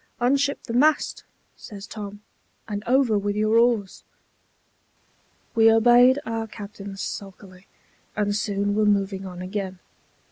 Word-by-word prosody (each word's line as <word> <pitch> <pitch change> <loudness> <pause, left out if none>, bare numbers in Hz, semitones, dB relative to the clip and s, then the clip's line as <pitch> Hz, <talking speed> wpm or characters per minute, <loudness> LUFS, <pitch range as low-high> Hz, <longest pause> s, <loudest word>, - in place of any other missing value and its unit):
"Unship 280 +3 +1
the 230 - -6
mast," 295 +5 +2 0.3
says 200 -1 -10
Tom, 205 -1 -8 0.5
"and 205 -1 -4
over 245 -4 +3
with 205 0 -2
your 215 +2 +3
oars." 230 -5 +1 1.5
We 225 -1 +6
obeyed 240 +3 +6
our 225 0 -3
captain 200 -1 -9
sulkily, 195 -1 -8 0.5
and 205 -1 0
soon 205 -1 -1
were 215 +1 +2
moving 195 -2 0
on 180 0 -8
again. 190 0 -4
210 Hz, 120 wpm, -24 LUFS, 200-230 Hz, 1.5 s, We